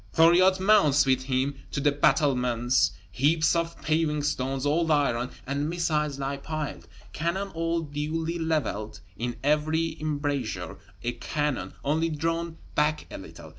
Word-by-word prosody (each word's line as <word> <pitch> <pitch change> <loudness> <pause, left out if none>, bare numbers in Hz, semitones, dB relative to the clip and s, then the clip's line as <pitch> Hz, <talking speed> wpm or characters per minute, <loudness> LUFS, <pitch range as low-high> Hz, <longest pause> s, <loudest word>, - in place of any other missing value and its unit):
Thuriot 180 +3 +6
mounts 185 -9 +5
with 130 -1 +1
him 135 +1 0 0.2
to - - -3
the 145 +1 +3
battlements; 125 - +2 0.2
heaps 155 - +2
of 170 0 -2
paving 155 -2 +1
stones, 135 -1 -1
old 160 +3 +2
iron, 130 -5 +2 0.2
and 140 +3 -1
missiles 150 -4 0
lie 140 0 -3
piled; 150 0 -5 0.3
cannon 170 +5 -2
all 165 -1 -1
duly 160 +3 -3
leveled; 150 - -2
in 120 +3 -3
every 155 +2 +1
embrasure 145 - -2 0.2
a 120 - 0
cannon, 145 +4 -3
only 160 +3 +1
drawn 165 +1 -2 0.2
back 150 +1 +1
a - - -6
little! - - -11
150 Hz, 135 wpm, -27 LUFS, 135-165 Hz, 0.3 s, Thuriot